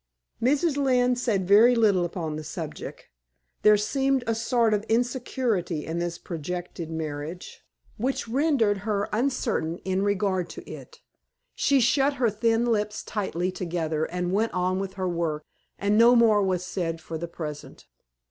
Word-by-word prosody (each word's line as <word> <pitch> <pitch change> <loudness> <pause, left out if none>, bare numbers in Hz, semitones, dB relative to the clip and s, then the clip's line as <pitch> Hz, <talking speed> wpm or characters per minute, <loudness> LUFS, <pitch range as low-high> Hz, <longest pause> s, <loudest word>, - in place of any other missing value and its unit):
Mrs. 285 +5 +2
Lynne 250 -3 +3
said 215 -7 -1
very 225 +5 +6
little 205 -6 +3
upon 165 -3 -4
the 155 - -5
subject; 155 - -7 0.5
there 210 0 +6
seemed 270 +5 0
a 230 - +1
sort 230 0 +1
of 205 0 0
insecurity 235 - -1
in 165 +1 -3
this 170 0 -3
projected 175 0 -6
marriage, 160 +1 -6 0.3
which 255 +2 -2
rendered 240 -5 +2
her 205 0 -1
uncertain 220 -9 0
in 190 0 0
regard 195 -3 0
to - - -10
it. - - -11 0.5
She 280 -1 +2
shut 270 +4 +3
her 240 -4 +1
thin 225 +2 +1
lips 210 -3 -1
tightly 185 -3 -2
together 165 -4 -2
and 180 0 -3
went 220 +1 0
on 185 +1 0
with 195 -1 -5
her 185 -1 -2
work, 165 -3 -2 0.3
and 205 +2 +2
no 240 +2 +7
more 225 -3 +5
was 185 -2 0
said 170 -3 -3
for 160 0 -6
the 170 - -4
present. 155 -3 -8
200 Hz, 155 wpm, -26 LUFS, 175-235 Hz, 0.5 s, no